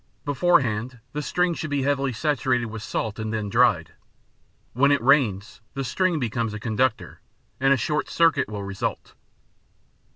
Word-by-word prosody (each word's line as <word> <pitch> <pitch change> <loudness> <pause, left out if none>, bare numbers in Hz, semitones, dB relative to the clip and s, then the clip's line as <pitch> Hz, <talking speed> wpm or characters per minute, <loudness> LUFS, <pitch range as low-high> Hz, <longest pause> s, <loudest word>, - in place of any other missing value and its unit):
Beforehand, 130 -6 +1
the 150 - -2
string 180 +5 0
should 155 -1 -5
be 140 -2 0
heavily 140 -1 0
saturated 125 -2 0
with 110 -1 -7
salt 110 +1 -3
and 110 0 -3
then 110 -2 -3
dried. 115 -9 +2 0.8
When 140 +4 +3
it 145 - +3
rains, 120 -6 +2
the 135 - -2
string 180 +6 0
becomes 115 -4 -2
a - - -6
conductor, 110 -4 -1 0.4
and 135 +1 +3
a 140 - +5
short 150 +5 -1
circuit 165 -8 +2
will 105 -2 -5
result. 100 -1 -4
125 Hz, 155 wpm, -24 LUFS, 110-145 Hz, 0.8 s, a